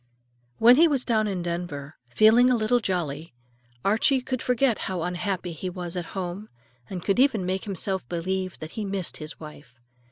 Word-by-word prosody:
When 240 +3 +7
he 335 +2 +7
was 275 -5 0
down 220 -3 +2
in 190 -4 -2
Denver, 170 -4 -5
feeling 220 - +5
a 250 - +4
little 230 +2 +2
jolly, 170 - -3 0.5
Archie 225 +7 +3
could 255 -1 -3
forget 250 -1 +1
how 180 -3 -2
unhappy 180 0 -2
he 180 +4 -5
was 175 -1 -6
at 175 -2 -3
home, 190 +3 -4 0.4
and 185 -3 -5
could 200 +3 +1
even 255 -8 +3
make 185 +1 -2
himself 190 - -3
believe 185 +2 -2
that 155 +1 -6
he 220 - -4
missed 195 -3 -2
his 155 +1 -8
wife. 150 -6 -12
190 Hz, 180 wpm, -25 LUFS, 175-220 Hz, 0.5 s, When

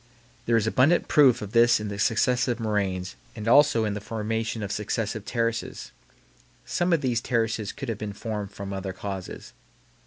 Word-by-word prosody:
There 115 0 +4
is 110 - +1
abundant 130 +9 +3
proof 130 -7 +5
of 100 - -7
this 115 0 +5
in 105 -1 -4
the 100 0 -6
successive 120 +3 +1
moraines 100 -4 -2 0.2
and 110 -1 -6
also 140 -3 +5
in 105 - -1
the 105 - -5
formation 110 +1 -3
of 100 - -4
successive 105 0 -3
terraces. 115 -1 -2 0.7
Some 175 +1 0
of 165 -3 +3
these 120 -4 0
terraces 115 -3 -1
could 135 - -7
have 115 -3 -3
been 105 -1 -5
formed 105 -2 -5
from 100 0 -7
other 95 -1 -4
causes. 95 -1 -7
110 Hz, 175 wpm, -26 LUFS, 105-120 Hz, 0.7 s, proof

